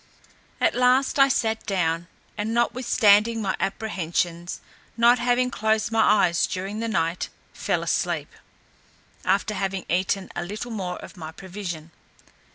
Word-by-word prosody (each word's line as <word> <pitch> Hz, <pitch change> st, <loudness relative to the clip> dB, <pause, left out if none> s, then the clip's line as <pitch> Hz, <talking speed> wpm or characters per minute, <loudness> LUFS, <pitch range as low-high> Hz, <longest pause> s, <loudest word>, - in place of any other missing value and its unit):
At -, -, +3 dB
last 255 Hz, +3 st, +3 dB
I 275 Hz, -, +8 dB
sat 225 Hz, -5 st, 0 dB
down, 170 Hz, -4 st, 0 dB, 0.3 s
and 220 Hz, +2 st, -2 dB
notwithstanding 230 Hz, -2 st, +3 dB
my 195 Hz, -3 st, -1 dB
apprehensions, 175 Hz, -4 st, -2 dB, 0.4 s
not 235 Hz, +1 st, +5 dB
having 245 Hz, +1 st, +2 dB
closed 220 Hz, -1 st, 0 dB
my 225 Hz, 0 st, +3 dB, 0.2 s
eyes 170 Hz, 0 st, +1 dB
during 195 Hz, +3 st, -4 dB
the 230 Hz, -, -2 dB
night, 170 Hz, -5 st, -1 dB, 0.2 s
fell -, -, -1 dB
asleep, -, -, -1 dB, 0.9 s
after 215 Hz, -, +1 dB
having 195 Hz, -2 st, -2 dB
eaten 190 Hz, +2 st, 0 dB
a -, -, -2 dB
little 210 Hz, +6 st, -6 dB
more 185 Hz, -5 st, -3 dB
of -, -, -11 dB
my 160 Hz, -2 st, -7 dB
provision. 175 Hz, -3 st, -7 dB
205 Hz, 135 wpm, -24 LUFS, 180-230 Hz, 0.9 s, I